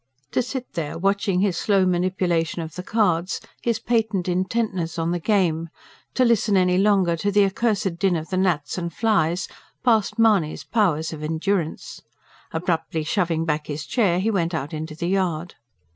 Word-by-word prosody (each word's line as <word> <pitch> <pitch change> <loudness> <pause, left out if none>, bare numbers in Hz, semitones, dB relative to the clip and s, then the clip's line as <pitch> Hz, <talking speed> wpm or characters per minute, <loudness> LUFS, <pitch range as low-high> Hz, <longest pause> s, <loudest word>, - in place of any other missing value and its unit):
To - - +2
sit 255 +1 -5
there 165 -4 -3
watching 195 +1 +1
his 195 -4 +1
slow 195 -1 +2
manipulation 175 -2 0
of 160 -1 -8
the 180 - -5
cards, 185 -4 0 0.2
his 235 -2 0
patent 220 -6 0
intentness 185 -2 -1
on 165 0 0
the 175 - -1
game; 170 -4 +1 0.5
to 255 - +4
listen 220 -3 +3
any 180 0 +3
longer 195 -4 +3
to 205 +5 0
the 205 0 +5
accursed 195 -3 -1
din 190 -1 +2
of 160 0 -5
the 185 - 0
gnats 180 -3 0
and 170 -1 -4
flies 185 -5 +1 0.4
passed 225 -4 +2
Mahony's 210 -9 +2
powers 170 -8 +1
of 155 - -7
endurance. 160 +2 -2 0.5
Abruptly 160 -1 -1
shoving 165 -1 0
back 150 -1 -1
his 145 0 -4
chair, 190 - +2
he 215 +4 +1
went 170 -4 0
out 145 -1 -4
into 155 0 -5
the 170 +2 -3
yard. 180 -3 -1
180 Hz, 170 wpm, -23 LUFS, 165-205 Hz, 0.5 s, the